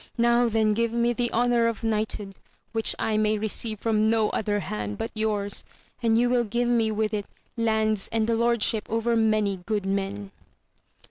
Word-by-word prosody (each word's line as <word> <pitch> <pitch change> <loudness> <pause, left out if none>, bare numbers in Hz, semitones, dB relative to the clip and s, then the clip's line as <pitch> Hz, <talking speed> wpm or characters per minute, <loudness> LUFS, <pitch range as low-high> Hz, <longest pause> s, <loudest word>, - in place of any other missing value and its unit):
Now 235 0 +3
then 220 -1 +2
give 230 +1 0
me 235 0 +1
the 240 0 -1
honour 240 0 +2
of 230 -1 -3
knighthood, 215 -2 -2 0.4
which 225 -1 +2
I 215 -1 0
may 215 0 +2
receive 215 0 -1
from 220 -1 +1
no 220 -1 +2
other 205 -1 -1
hand 105 - -4
but - - -4
yours! 210 -2 -1 0.4
and 225 -1 +3
you 240 +1 +3
will 245 -1 +2
give 235 +2 -1
me 235 -2 +2
with' 215 0 -1
it 205 -1 -2 0.3
lands 220 -3 0
and 225 -1 +1
the 230 - 0
lordship 230 -2 +1
over 230 +1 0
many 215 -3 +2
good 205 +2 -3
men. 195 +1 -3
220 Hz, 180 wpm, -25 LUFS, 210-230 Hz, 0.4 s, Now